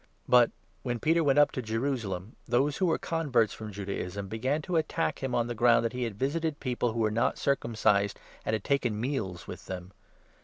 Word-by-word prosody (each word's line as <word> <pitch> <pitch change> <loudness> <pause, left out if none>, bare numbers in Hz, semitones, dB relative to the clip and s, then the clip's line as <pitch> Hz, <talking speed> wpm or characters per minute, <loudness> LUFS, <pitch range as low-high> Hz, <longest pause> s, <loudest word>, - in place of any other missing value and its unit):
But, 125 -1 +6 0.3
when 120 -2 -2
Peter 165 +6 +3
2 - - +3
went 140 0 +3
up 145 0 +6
to 130 - -3
Jerusalem, 110 -4 -2
those 135 +5 +2
who 185 - +2
were 165 - +2
converts 140 -9 +1
from 110 -1 -7
Judaism 100 0 -4
began 130 +9 -1
to 175 0 0
attack 160 +1 -1
him 130 -2 -1
on 120 -1 +2
the 120 - -3
ground 115 0 +4
that 115 - -1
he 125 -1 -1
had 110 -4 -5
visited 150 +4 -1
people 125 -2 0
3 - - -4
who - - -1
were 110 -1 +2
not 115 +2 +1
circumcised, 105 -7 +1 0.2
and 110 - 0
had 105 - -4
taken 125 -7 0
meals 110 -8 -3
with - - -9
them. 90 0 -6
120 Hz, 215 wpm, -29 LUFS, 110-140 Hz, 0.3 s, But